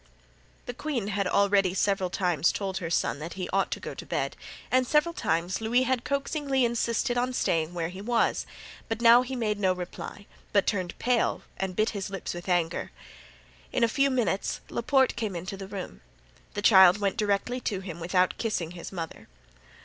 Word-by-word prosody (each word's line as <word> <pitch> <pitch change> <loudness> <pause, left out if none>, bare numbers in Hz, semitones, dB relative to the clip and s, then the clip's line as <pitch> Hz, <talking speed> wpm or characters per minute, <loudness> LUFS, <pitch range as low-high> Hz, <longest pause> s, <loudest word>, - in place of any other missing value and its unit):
The 245 - -5
queen 245 -6 -3
had 200 -2 0 0.5
several 195 -2 +1
times 175 -4 +1
already - - -3
told 195 -2 -3
her 170 -4 -4
son 165 - 0
that 165 +3 -6
he 185 -2 -4
ought 195 0 +2
to - - -3
go - - -6
to - - -8
bed, - - -2 0.4
and 255 0 +3
several 300 +4 +3
times 175 - -1
Louis 240 +3 +2
had 260 -1 0
coaxingly 280 -2 0
insisted 235 +1 0
on 250 +1 -1
staying 165 -7 0
where 165 -1 -2
he 185 +2 -8
was; 235 +2 +1 0.4
but 225 0 -2
now 235 +1 +7
he 260 +1 -4
made 215 -4 -1
no 190 -2 +3
reply, 180 +3 -7 0.3
but 200 -2 +4
turned 185 -4 -1
pale 245 -1 +1
and 190 -1 -3
bit 215 +3 +2
his 200 -3 -4
lips 195 -1 -5
with 175 +2 -7
anger. 175 -2 0 0.8
In - - +1
a - - +6
few 275 +4 +2
minutes 225 -8 0
Laporte 265 +2 +2
came 210 -5 -3
into 180 +3 -5
the 195 0 -8
room. 190 - -7 0.5
The 205 - -3
child 190 -3 +8
went 200 -2 0
directly 210 +4 0
to 200 -6 -2
him 175 -3 -7
without 180 +2 +1
kissing 195 -8 -2
his 175 -1 -8
mother. 165 -4 -7
200 Hz, 190 wpm, -27 LUFS, 180-240 Hz, 0.8 s, child